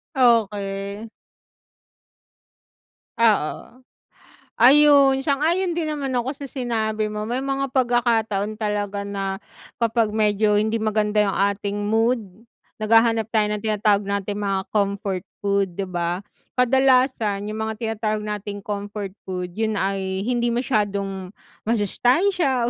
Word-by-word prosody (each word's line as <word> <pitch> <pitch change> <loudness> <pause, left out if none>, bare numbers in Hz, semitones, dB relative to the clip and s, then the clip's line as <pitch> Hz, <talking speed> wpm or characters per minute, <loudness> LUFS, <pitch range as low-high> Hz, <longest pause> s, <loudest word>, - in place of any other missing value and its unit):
Okey. 205 -3 +1 2.1
Oo, 230 +4 0 0.8
ayun 275 0 +6
sang-ayon 330 +5 +1
din 330 -2 -2
naman 285 -3 -3
ako 255 +3 -1
sa 285 - -8
sinabi 220 -5 -2
mo 210 0 -4
may 245 +3 -2
mga 275 0 -2
pagkakataon 225 -4 +1
talaga 205 -1 -2
na 195 -1 -3 0.4
kapag 230 -2 +1
medyo 210 -1 +2
hindi 220 +1 0
maganda 215 -1 +1
yung 195 - 0 0.2
ating 200 0 -3
mood 225 +3 +2 0.6
naghahanap 225 0 +3
tayo 210 -1 +3
ng 210 - -1
tinatawag 210 -1 +2
nating 200 0 -2
mga 195 -2 -2
comfort 200 -2 -1 0.2
food, 200 -3 0
'di 195 - -3
ba? 175 +1 -2 0.3
Kadalasan 250 -5 +2
yung 215 - -5
mga 220 - -3
tinatawag 215 -1 -2
nating 205 -1 -5
comfort 205 -1 -5 0.2
food 180 -1 -4
'yun 220 +4 -1
ay 195 -1 -2
hindi 240 +1 0
masyadong 200 -6 -2 0.3
masustansiya 255 - +1
215 Hz, 115 wpm, -22 LUFS, 200-245 Hz, 2.1 s, ayun